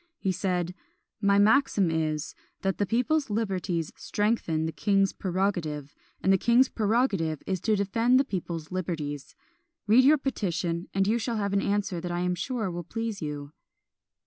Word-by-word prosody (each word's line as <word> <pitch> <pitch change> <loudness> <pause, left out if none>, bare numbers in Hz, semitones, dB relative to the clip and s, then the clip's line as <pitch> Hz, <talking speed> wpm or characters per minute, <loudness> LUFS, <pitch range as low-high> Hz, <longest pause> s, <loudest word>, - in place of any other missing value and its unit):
He 190 - -1
said 180 -2 -1 0.5
"My 200 -1 +4
maxim 210 -4 +4
is, 155 -1 -1 0.3
that 195 -1 -1
the 205 - +1
people's 255 +6 +1
liberties 190 -6 -2
strengthen 205 -7 0
the 160 - -2
king's 195 +1 +2
prerogative; 175 -7 -2 0.3
and 190 - +4
the 190 - +3
king's 240 +5 +4
prerogative 205 - 0
is 190 -1 -1
to 220 - +2
defend 225 +6 +3
the - - +4
people's 170 - -5
liberties. 155 -6 -4 0.5
Read 225 +5 +6
your 300 +4 +6
petition, 180 - -2
and 195 0 +1
you 225 +4 +2
shall 230 0 -2
have 200 -1 -1
an 200 - +2
answer 200 -4 -1
that 175 0 -4
I 175 0 -1
am 180 0 +1
sure 215 +2 -2
will 175 0 -5
please 225 +2 -4
you." 145 -2 -5
195 Hz, 165 wpm, -27 LUFS, 170-220 Hz, 0.5 s, Read